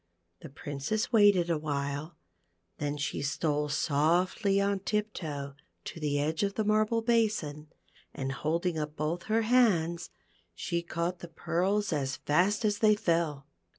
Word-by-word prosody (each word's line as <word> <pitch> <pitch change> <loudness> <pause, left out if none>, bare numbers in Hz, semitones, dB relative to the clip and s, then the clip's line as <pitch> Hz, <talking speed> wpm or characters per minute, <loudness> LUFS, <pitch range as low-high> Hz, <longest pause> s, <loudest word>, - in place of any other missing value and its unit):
The - - -10
Princess 145 - -3
waited 200 -6 +5
a 160 - +1
while, 145 +1 -3 0.6
then 145 0 -2
she 145 - -2
stole 150 +1 -1
softly 170 +8 +2
on 200 0 +1
tip 210 +2 -1
toe 145 -4 -5 0.3
to - - -7
the 145 -2 0
edge 155 +2 -1
of 200 -1 0
the 220 - 0
marble 215 +2 +2
basin, 215 -11 0 0.4
and 135 0 -4
holding 160 +4 -1
up 150 0 -4
both 160 +3 -2
her 225 +1 +1
hands, 185 -8 +2 0.5
she 170 -1 -2
caught 170 +1 -3
the 175 - -8
pearls 185 +4 0
as 135 -3 -1
fast 185 +9 +1
as 205 -1 +1
ihey 215 -2 +5
fell. 165 -8 0
170 Hz, 150 wpm, -30 LUFS, 150-205 Hz, 0.6 s, waited